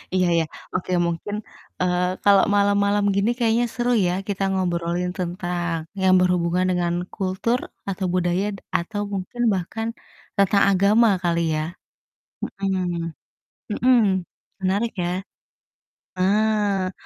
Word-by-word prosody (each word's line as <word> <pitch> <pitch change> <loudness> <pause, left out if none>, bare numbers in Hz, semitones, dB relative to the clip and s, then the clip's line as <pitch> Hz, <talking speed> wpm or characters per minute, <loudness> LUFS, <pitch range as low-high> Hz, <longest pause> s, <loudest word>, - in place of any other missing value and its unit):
Iya 185 -1 +3
ya, - - +2 0.3
oke 185 0 -2 0.2
mungkin, 170 +5 -3 0.5
eee, 180 0 +2 0.2
kalau 200 -1 +6
malam-malam 200 0 +3
gini 200 +3 +2
kayaknya 235 0 +2
seru 245 0 0 0.2
ya, 175 - 0
kita 200 -1 -2
ngobrolin 175 -1 -1
tentang 175 -1 -2 0.2
yang 190 0 +5
berhubungan 180 0 +2
dengan 175 -1 0 0.2
kultur 195 +6 0 0.3
atau 190 0 -2
budaya 180 +1 +1
d - - -10 0.2
atau 205 +5 -4
mungkin 195 +5 -4
bahkan 195 +5 -3 0.5
tentang 200 0 +4
agama 200 +5 +4 0.2
kali 170 -1 +1
ya? 155 - 0 0.8
Mhm, 180 -4 -2 0.6
mhm, 250 +4 +4 0.6
menarik 200 +5 0
ya? 175 - -1 1.1
Ah 205 -1 +2
190 Hz, 115 wpm, -23 LUFS, 180-205 Hz, 1.1 s, kalau